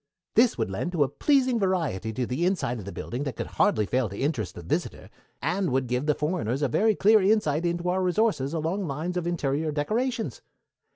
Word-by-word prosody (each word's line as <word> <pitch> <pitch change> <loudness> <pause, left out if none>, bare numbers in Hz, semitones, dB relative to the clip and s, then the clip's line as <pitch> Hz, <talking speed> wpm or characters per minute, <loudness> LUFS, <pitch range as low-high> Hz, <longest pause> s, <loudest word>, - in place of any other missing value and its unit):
This 235 +1 +4
would 110 -5 -1
lend 175 - -3
a 145 -4 +3
pleasing 255 - +2
variety 165 - 0
to 125 +3 -2
the 130 +8 -2
inside 175 - 0
of 100 - -8
the 100 - -6
building 120 +6 -5
that 135 -5 -4
could - - -3
hardly 105 - +2
fail 125 0 0
to 100 - -8
interest 135 - -2
the 85 - -8
visitor, 80 - -3 0.3
and 180 +2 0
would 130 0 +1
give 125 +4 -2
the 150 - +3
foreigners 150 -5 -1
a - - +3
very 215 - +2
clear 215 +2 +5
insight 180 -6 +2
into 170 +1 -2
our 185 +1 +1
resources 180 -6 +1
along 165 +4 -1
lines 155 +6 -3
of 175 -1 -2
interior 155 -2 -1
decorations. 230 - -2
160 Hz, 205 wpm, -26 LUFS, 130-190 Hz, 0.3 s, clear